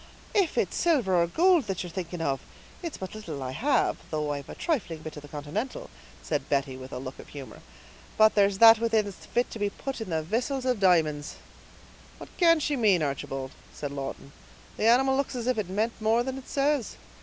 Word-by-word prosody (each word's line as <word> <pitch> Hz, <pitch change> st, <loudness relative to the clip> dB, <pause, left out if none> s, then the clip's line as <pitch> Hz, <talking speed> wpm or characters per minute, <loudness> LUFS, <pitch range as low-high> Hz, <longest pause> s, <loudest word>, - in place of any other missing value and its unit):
"If 390 Hz, -6 st, +2 dB
it's -, -, +1 dB
silver 245 Hz, -, +3 dB
or 170 Hz, -, +2 dB
goold 345 Hz, -, +4 dB
that 195 Hz, -2 st, -2 dB
ye're 175 Hz, -, -6 dB
thinking 175 Hz, -1 st, -5 dB
of, 135 Hz, -4 st, -1 dB, 0.4 s
it's 335 Hz, -4 st, -5 dB
but 190 Hz, -, -7 dB
little 165 Hz, -11 st, -6 dB
I 130 Hz, -, -4 dB
have, 270 Hz, -, +1 dB
though 150 Hz, -1 st, -1 dB
I've 140 Hz, -1 st, -7 dB
a -, -, -7 dB
trifling 190 Hz, -, -2 dB
bit 155 Hz, -, -7 dB
of 150 Hz, -, -8 dB
the 145 Hz, -, -12 dB
continental," 150 Hz, -, -5 dB, 0.3 s
said -, -, -2 dB
Betty, 135 Hz, -2 st, 0 dB
with 130 Hz, 0 st, -10 dB
a -, -, -5 dB
look 130 Hz, +1 st, -7 dB
of -, -, -11 dB
humor; 140 Hz, -3 st, -10 dB, 0.6 s
"but 215 Hz, 0 st, +6 dB
there's 200 Hz, -1 st, +3 dB
that 225 Hz, +1 st, +9 dB
within 225 Hz, -2 st, +2 dB
that's 200 Hz, -2 st, -10 dB
fit 245 Hz, +1 st, 0 dB
to 225 Hz, -, -7 dB
be 205 Hz, 0 st, +1 dB
put 265 Hz, +4 st, -6 dB
in 220 Hz, -, -4 dB, 0.2 s
vissils 250 Hz, -, -1 dB
of 250 Hz, -4 st, +1 dB
di'monds." 160 Hz, -6 st, +2 dB, 0.8 s
"What -, -, -12 dB
can 335 Hz, -2 st, +5 dB
she 295 Hz, -1 st, 0 dB
mean, 205 Hz, -, +3 dB
Archibald?" 135 Hz, -1 st, -3 dB, 0.2 s
asked 145 Hz, -1 st, -5 dB
Lawton. 140 Hz, 0 st, -6 dB, 0.4 s
"The 220 Hz, -, +1 dB
animal 265 Hz, +3 st, +5 dB
looks 275 Hz, -1 st, -1 dB
as 240 Hz, -2 st, -3 dB
if 250 Hz, -3 st, +1 dB
it 195 Hz, -4 st, -3 dB
meant 215 Hz, +4 st, 0 dB
more 225 Hz, +2 st, +3 dB
than 265 Hz, +1 st, -4 dB
it 265 Hz, -, -14 dB
says!" 280 Hz, -3 st, 0 dB
205 Hz, 210 wpm, -27 LUFS, 150-255 Hz, 0.8 s, that